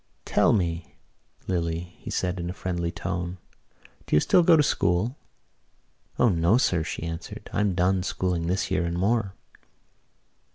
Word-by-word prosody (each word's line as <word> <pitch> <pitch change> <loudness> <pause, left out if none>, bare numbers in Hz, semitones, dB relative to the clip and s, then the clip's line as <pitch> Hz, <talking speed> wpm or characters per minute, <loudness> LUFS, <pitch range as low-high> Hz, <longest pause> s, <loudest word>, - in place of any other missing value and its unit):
"Tell - - +3
me, 85 -5 -1 0.5
Lily," 85 -1 -2
he - - -8
said 90 0 -1
in 85 0 -3
a - - -3
friendly 85 -2 -2
tone, 90 +1 -4 0.7
"do - - +1
you - - +7
still 175 - +4
go 165 -1 +6
to 150 - +5
school?" 100 0 +1 1.0
"O 125 - +4
no, 85 +2 +3
sir," 90 -9 +2
she 85 -1 -5
answered. 85 0 -7
"I'm 105 -3 +1
done 90 +1 +2
schooling 90 -2 -1
this 95 +2 -1
year 95 -2 +1
and 85 0 -2
more." 100 0 0
90 Hz, 155 wpm, -26 LUFS, 85-95 Hz, 1.0 s, you